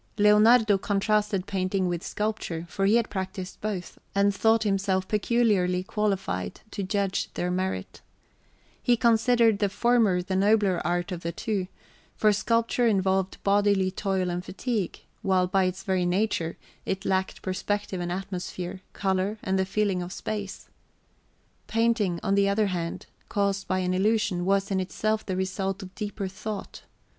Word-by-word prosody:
Leonardo 210 0 +5
contrasted 205 -1 +1
painting 185 -1 0
with 175 -1 -2
sculpture, 210 -6 -3
for 195 +3 0
he 210 - +5
had 235 -1 +1
practised 190 -1 -5
both, 200 -4 -4 0.2
and 200 0 +3
thought 225 +2 +3
himself 195 -2 0
peculiarly 210 -5 +2
qualified 200 -1 -2
to - - -4
judge 195 0 -1
their 180 0 -1
merit. 180 - -3 0.8
He 240 -1 +3
considered 230 -2 +4
the 205 -2 +2
former 215 -4 +2
the 190 +1 -3
nobler 200 -1 +3
art 175 +1 -1
of 175 -2 -4
the 170 - -3
two, 195 -1 -2 0.5
for 215 -1 +4
sculpture 230 +3 +1
involved 190 -2 +1
bodily 200 -1 +3
toil 190 -2 -1
and 175 +1 -3
fatigue, 210 +1 -3 0.2
while 185 -1 +2
by 190 +1 +2
its 185 +1 -3
very 185 -2 +1
nature 180 -3 0 0.3
it 190 0 -3
lacked 190 0 -1
perspective 190 0 -2
and 175 0 -3
atmosphere, 185 0 -5
colour, 195 +2 0
and 190 0 0
the 190 - +2
feeling 195 -2 0
of 175 +1 -6
space. 205 -1 -5 1.0
Painting, 225 -6 +1
on 195 - +1
the 200 0 +3
other 210 +2 +2
hand, 170 -1 -4 0.2
caused 200 -1 0
by 185 - 0
an 180 -1 0
illusion, 205 -2 +1
was 195 +1 +1
in 190 - +1
itself 215 +4 -1
the 190 - -3
result 190 +1 -2
of 185 0 -10
deeper 205 -1 -4
thought. 210 +2 -6
195 Hz, 150 wpm, -27 LUFS, 185-210 Hz, 1.0 s, Leonardo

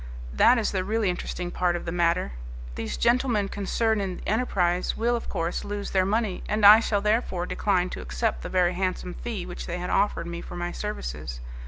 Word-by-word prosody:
That 245 - +5
is 225 - 0
the 190 -2 -1
really 210 -1 +1
interesting 175 0 -4
part 175 -1 +1
of 175 - -5
the 165 - -3
matter. 170 - +1 0.4
These - - -4
gentlemen 235 -4 +2
concerned 215 +2 0
in 185 -2 -3
the - - -9
enterprise 185 -6 +1
will, 240 +2 +1
of 235 - -5
course, 165 +1 -2
lose 205 0 -4
their 190 -1 +2
money, 215 -2 0
and 210 0 +2
I 210 +2 +11
shall 210 -3 0
therefore 210 -4 0
decline 185 -2 0
to - - -5
accept - - -2
the - - -6
very 180 -1 +2
handsome 185 -1 -2
fee 215 -5 -5
which 175 - -7
they 175 - -3
had 180 0 -4
offered 195 -4 +1
me 170 0 -5
for - - -9
my 175 0 -3
services. - - -5
185 Hz, 205 wpm, -26 LUFS, 175-215 Hz, 0.4 s, I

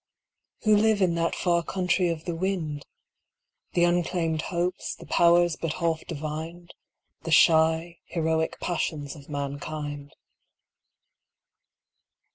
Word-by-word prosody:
Who 215 -1 +5
live 215 0 +3
in 185 -3 +3
that 165 0 0
far 170 -1 +1
country 180 0 0
of 165 -1 -4
the 175 - -2
wind? 165 -5 -2 0.9
The 175 - +3
unclaimed 175 -2 +1
hopes, 175 +1 -2
the - - -13
powers 175 -1 +4
but 165 -2 -2
half 165 -2 -1
divined, 160 +2 -6 0.5
The 165 - -6
shy, 165 +1 +4
heroic 160 -1 -1
passions 155 -4 -2
of 145 -1 -14
mankind. 145 0 -5
165 Hz, 110 wpm, -26 LUFS, 155-175 Hz, 0.9 s, Who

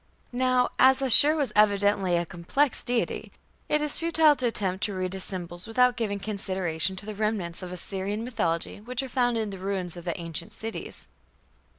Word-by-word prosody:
Now, 255 0 +2
as 265 +1 +6
Ashur 275 +3 +6
was 280 -8 -1
evidently 205 -3 +3
a 170 - -1
complex 175 - 0
deity, 240 -1 -2 0.4
it 300 0 +2
is 300 - 0
futile 320 -2 +4
to 250 -1 +1
attempt 195 -4 -2
to 205 - -4
read 185 0 -3
his 190 -1 -3
symbols 175 0 -3
without 250 +2 +3
giving 215 -4 -2
consideration 190 -4 -1
to 190 - -5
the 215 - -5
remnants 205 -5 -2
of 180 -1 -7
Assyrian 195 +3 -3
mythology 175 -7 -2
which 250 +4 -3
are - - -5
found 245 -2 +1
in 215 -2 -2
the 195 - -8
ruins 185 -2 -2
of 175 0 -10
the 170 -1 -3
ancient 165 0 -4
cities. 225 +1 -5
205 Hz, 185 wpm, -26 LUFS, 185-245 Hz, 0.4 s, as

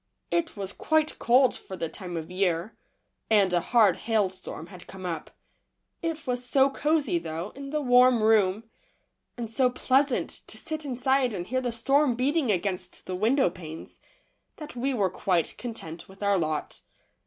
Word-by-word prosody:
It 330 -7 0
was 195 0 -4
quite 315 -1 +1
cold 250 +2 +4
for 190 - -8
the 165 - -2
time 175 0 -7
of 160 +2 -6
year, 180 +1 0 0.5
and 200 -4 +4
a 175 - +4
hard 210 -2 +4
hailstorm 190 -7 -2
had 180 0 -13
come 190 -1 -9
up. 165 -3 -4 0.7
It 325 -2 -3
was 250 -1 -1
so 270 +2 +3
cosey, 310 +4 +1
though, 165 - -5
in 275 0 -8
the 300 +1 -1
warm 250 -2 +5
room, 215 -1 +3 0.7
and 235 -1 -4
so 250 +3 +2
pleasant 260 +1 +1 0.2
to - - -2
sit 315 -1 -3
inside 260 -1 +1
and 175 -2 -4
hear 255 +6 -1
the 245 -2 -2
storm 270 +3 +2
beating 270 0 +1
against 185 -1 -3
the 185 - -4
window 225 +2 +2
panes, 160 -3 -10 0.6
that 300 -3 -9
we 260 +3 -1
were 200 -8 +1
quite 180 -3 0
content 175 -10 -7
with 195 +1 -11
our 200 -1 +3
lot. 155 -2 -3
225 Hz, 165 wpm, -27 LUFS, 185-265 Hz, 0.7 s, warm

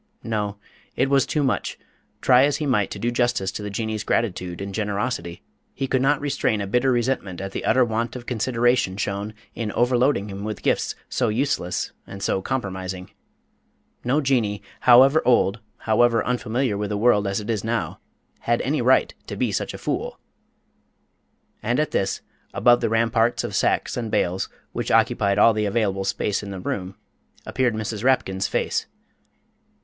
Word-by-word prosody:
No, 105 -2 -2 0.4
it 135 +2 +1
was 135 -2 +4
too 150 - 0
much. 130 - -1 0.4
Try 130 0 +6
as 145 - +1
he 155 - -3
might 115 -8 +1
to - - -6
do 120 - -1
justice 120 -6 0
to 105 - -6
the 105 - -4
Jinnee's 110 +1 -3
gratitude 90 -6 -1
and 100 0 -5
generosity, 100 -4 -3 0.3
he 135 - -2
could 130 -1 +1
not 140 +2 +3
restrain 140 -6 0
a 100 - -2
bitter 125 +6 +2
resentment 120 -7 -1
at 95 0 -5
the - - -4
utter 130 -1 +4
want 115 +1 -2
of 125 -1 -7
consideration 120 -4 +1
shown 100 +1 -3 0.2
in 110 -3 -3
overloading 125 -2 +2
him 100 0 -6
with 105 -2 -5
gifts - - +1
so - - 0
useless 110 -7 -1 0.2
and 95 0 -8
so 95 - 0
compromising. 95 -6 -4 0.9
No 135 +5 +2
Jinnee 120 -7 0 0.2
however 130 +5 +6
old, 115 -3 +3 0.2
however 115 0 +2
unfamiliar 120 -2 -1
with 105 -1 -2
the 105 - -1
world 105 -2 +3
as 100 +1 -1
it 105 +2 -3
is 105 -4 -2
now 115 +1 -2 0.4
had - - 0
any - - 0
right - - +3
to - - -5
be - - 0
such - - -2
a - - -6
fool! - - -3 1.4
And 120 +5 0
at 155 - 0
this, 95 0 -1 0.3
above 120 0 +5
the 115 - +1
ramparts 115 +1 +2
of - - -4
sacks - - +1
and 115 -2 -3
bales, 90 -2 0 0.2
which - - -3
occupied 100 0 +3
all 115 +2 +6
the 105 0 0
available 100 -2 0
space 100 +1 -1
in 105 - -7
the 95 -1 -6
room, 95 +1 -4 0.5
appeared 125 -4 0
Mrs. 110 0 -4
Rapkin's 100 -7 +1
face. - - -1
110 Hz, 175 wpm, -23 LUFS, 100-125 Hz, 1.4 s, Try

